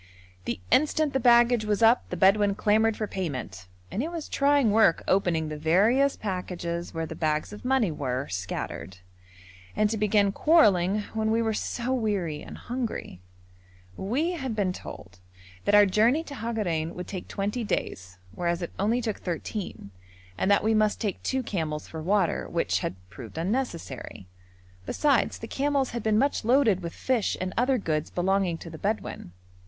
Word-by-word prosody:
The 115 Hz, -4 st, -3 dB
instant 305 Hz, 0 st, +3 dB
the 265 Hz, -, +2 dB
baggage 240 Hz, -1 st, +5 dB
was 210 Hz, +1 st, 0 dB
up 230 Hz, +2 st, +4 dB
the 180 Hz, -, -4 dB
Bedouin 200 Hz, +2 st, +4 dB
clamoured 215 Hz, +1 st, +2 dB
for 215 Hz, -, -1 dB
payment, 130 Hz, -, -5 dB, 0.2 s
and 220 Hz, -, -1 dB
it 310 Hz, -, -2 dB
was 335 Hz, -3 st, -5 dB
trying 280 Hz, -5 st, +3 dB
work 215 Hz, -5 st, +4 dB
opening 175 Hz, -5 st, +2 dB
the 150 Hz, -1 st, -6 dB
various 215 Hz, -, +3 dB
packages 175 Hz, -3 st, -4 dB
where 165 Hz, 0 st, -3 dB
the -, -, -7 dB
bags 155 Hz, +4 st, -1 dB
of 210 Hz, -, -10 dB
money 250 Hz, -7 st, +2 dB
were 130 Hz, -3 st, -3 dB
scattered, 95 Hz, 0 st, -5 dB, 0.8 s
and 215 Hz, 0 st, +2 dB
to 225 Hz, -, -1 dB
begin 205 Hz, -1 st, +3 dB
quarrelling 205 Hz, -, +4 dB
when 220 Hz, 0 st, 0 dB
we 225 Hz, +1 st, +2 dB
were 225 Hz, -1 st, 0 dB
so 245 Hz, +4 st, -2 dB
weary 200 Hz, -11 st, -1 dB
and -, -, -9 dB
hungry. 240 Hz, -, -5 dB, 0.7 s
We 260 Hz, -, -1 dB
had 265 Hz, -9 st, -4 dB
been 195 Hz, -4 st, 0 dB
told 95 Hz, -, -10 dB, 0.5 s
that 205 Hz, -, +4 dB
our 205 Hz, 0 st, +8 dB
journey 225 Hz, +10 st, +3 dB
to 295 Hz, -, -9 dB
Hagarein 210 Hz, -, -2 dB
would 180 Hz, -, -5 dB
take 185 Hz, -3 st, -7 dB
twenty 210 Hz, +5 st, -2 dB
days, 95 Hz, -, -3 dB, 0.2 s
whereas 170 Hz, -, -1 dB
it 170 Hz, -, -5 dB
only 225 Hz, +5 st, +1 dB
took 220 Hz, -3 st, -2 dB
thirteen, 175 Hz, -, -5 dB, 0.4 s
and 190 Hz, -, 0 dB
that 200 Hz, -, +4 dB
we 220 Hz, +1 st, +2 dB
must 215 Hz, -1 st, +2 dB
take 205 Hz, -5 st, -3 dB
two 265 Hz, -1 st, -1 dB
camels 160 Hz, -8 st, -3 dB
for 160 Hz, -, -7 dB
water, 190 Hz, +2 st, +1 dB
which -, -, 0 dB
had -, -, -3 dB, 0.2 s
proved 115 Hz, -, -10 dB
unnecessary; 170 Hz, -, -3 dB, 0.6 s
besides 285 Hz, -5 st, +2 dB
the 225 Hz, -, -8 dB
camels 280 Hz, 0 st, 0 dB
had 235 Hz, -, -3 dB
been 215 Hz, 0 st, +2 dB
much 280 Hz, +3 st, +1 dB
loaded 235 Hz, -5 st, +4 dB
with 170 Hz, -1 st, -5 dB
fish 245 Hz, 0 st, 0 dB
and 185 Hz, 0 st, -3 dB
other 255 Hz, +2 st, +2 dB
goods 155 Hz, -7 st, -2 dB
belonging 185 Hz, -1 st, 0 dB
to 165 Hz, -, -9 dB
the 160 Hz, -, -9 dB
Bedouin. 205 Hz, -, -3 dB
205 Hz, 170 wpm, -27 LUFS, 170-235 Hz, 0.8 s, our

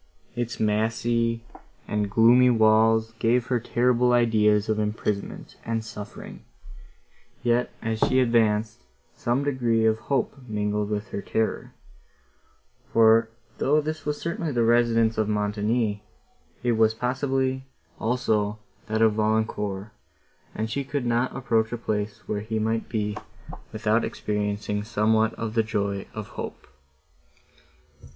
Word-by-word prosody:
Its 120 Hz, -1 st, -3 dB
massy 115 Hz, +2 st, 0 dB, 0.4 s
and 105 Hz, -1 st, -1 dB
gloomy 120 Hz, +4 st, +6 dB
walls 110 Hz, 0 st, +4 dB
gave 120 Hz, +1 st, +2 dB
her 125 Hz, -2 st, 0 dB
terrible 125 Hz, +1 st, +2 dB
ideas 110 Hz, -3 st, +3 dB
of 110 Hz, 0 st, 0 dB
imprisonment 105 Hz, -1 st, -3 dB
and 115 Hz, -1 st, -2 dB
suffering: 105 Hz, -2 st, -9 dB, 1.0 s
yet, 120 Hz, 0 st, +2 dB
as 110 Hz, -1 st, -2 dB
she 130 Hz, +3 st, +3 dB
advanced, 110 Hz, -, +2 dB, 0.3 s
some 120 Hz, +4 st, -1 dB
degree 120 Hz, -5 st, +1 dB
of 110 Hz, 0 st, +2 dB
hope 135 Hz, +4 st, -1 dB
mingled 105 Hz, -1 st, -1 dB
with 105 Hz, 0 st, -3 dB
her 100 Hz, -, -4 dB
terror; 110 Hz, +2 st, -2 dB, 1.2 s
for, 115 Hz, 0 st, +5 dB, 0.3 s
though 150 Hz, +3 st, +3 dB
this 155 Hz, 0 st, -4 dB
was 150 Hz, 0 st, -2 dB
certainly 170 Hz, -1 st, -3 dB
the 120 Hz, -3 st, +1 dB
residence 115 Hz, -1 st, +3 dB
of 110 Hz, -1 st, +1 dB
Montoni, 105 Hz, +1 st, 0 dB, 0.6 s
it 120 Hz, -, +2 dB
was 110 Hz, -1 st, +3 dB
possibly, 130 Hz, +1 st, -1 dB, 0.3 s
also, 110 Hz, -3 st, 0 dB, 0.3 s
that 110 Hz, +1 st, +1 dB
of 110 Hz, -1 st, +4 dB
Valancourt, 105 Hz, -2 st, -1 dB, 0.6 s
and 110 Hz, -, -2 dB
she 140 Hz, +5 st, -2 dB
could 140 Hz, -1 st, -3 dB
not 120 Hz, +2 st, 0 dB
approach 115 Hz, -4 st, 0 dB
a 120 Hz, -, -2 dB
place, 105 Hz, -2 st, -4 dB
where 105 Hz, -, -2 dB
he 110 Hz, +1 st, -3 dB
might 110 Hz, +1 st, -1 dB
be, 105 Hz, -2 st, -2 dB, 0.6 s
without -, -, +1 dB
experiencing 105 Hz, 0 st, -2 dB
somewhat 110 Hz, 0 st, +1 dB
of 115 Hz, -1 st, -4 dB
the 115 Hz, -, +3 dB
joy 100 Hz, -2 st, -2 dB
of 110 Hz, -2 st, -6 dB
hope. -, -, -7 dB
110 Hz, 130 wpm, -25 LUFS, 105-120 Hz, 1.2 s, gloomy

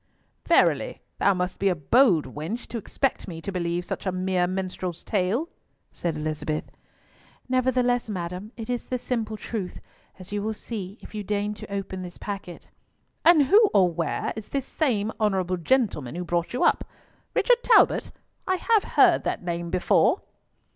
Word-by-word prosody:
"Verily, -, -, +3 dB, 0.2 s
thou 200 Hz, -1 st, +4 dB
must 180 Hz, 0 st, -2 dB
be 195 Hz, -, +3 dB
a 180 Hz, -, +1 dB
bold 175 Hz, -, +4 dB
wench 175 Hz, +11 st, -4 dB
to 235 Hz, -, -5 dB
expect 270 Hz, +5 st, -1 dB
me 165 Hz, -3 st, -6 dB
to 180 Hz, +5 st, -5 dB
believe 175 Hz, -1 st, -2 dB
such -, -, -4 dB
a -, -, +2 dB
mere 185 Hz, -1 st, 0 dB
minstrel's 185 Hz, -2 st, -4 dB
tale," 210 Hz, -, 0 dB, 0.4 s
said 170 Hz, -2 st, -3 dB
Elizabeth. 155 Hz, 0 st, -2 dB, 0.8 s
"Nevertheless, 250 Hz, -2 st, +1 dB
madam, 180 Hz, +2 st, -5 dB
it 225 Hz, -2 st, -6 dB
is 245 Hz, -1 st, -3 dB
the 255 Hz, -, -1 dB
simple 225 Hz, -3 st, -3 dB
truth, 210 Hz, -4 st, -5 dB, 0.4 s
as 185 Hz, +1 st, -11 dB
you 205 Hz, 0 st, -1 dB
will 220 Hz, +1 st, -2 dB
see 205 Hz, -3 st, -6 dB
if -, -, -12 dB
you 210 Hz, -, -3 dB
deign 205 Hz, +1 st, -1 dB
to 210 Hz, -, -10 dB
open 195 Hz, -1 st, -4 dB
this 180 Hz, -1 st, -8 dB
packet." 200 Hz, -4 st, -7 dB, 0.5 s
"And 325 Hz, -3 st, +7 dB
who 410 Hz, -, +6 dB
or 185 Hz, -3 st, +5 dB
where 165 Hz, 0 st, -2 dB
is 220 Hz, -2 st, -8 dB
this 275 Hz, -2 st, -2 dB
same 225 Hz, -10 st, 0 dB
honourable 190 Hz, -4 st, +1 dB
gentleman 175 Hz, -, 0 dB
who 180 Hz, -, -3 dB
brought 175 Hz, -1 st, -1 dB
you 250 Hz, -, 0 dB
up—Richard -, -, 0 dB
Talbot? -, -, +4 dB, 0.4 s
I 375 Hz, -, +2 dB
have 435 Hz, +3 st, +2 dB
heard -, -, +6 dB
that -, -, -2 dB
name 170 Hz, -1 st, -3 dB
before!" 180 Hz, -, +3 dB
200 Hz, 165 wpm, -25 LUFS, 180-235 Hz, 0.8 s, And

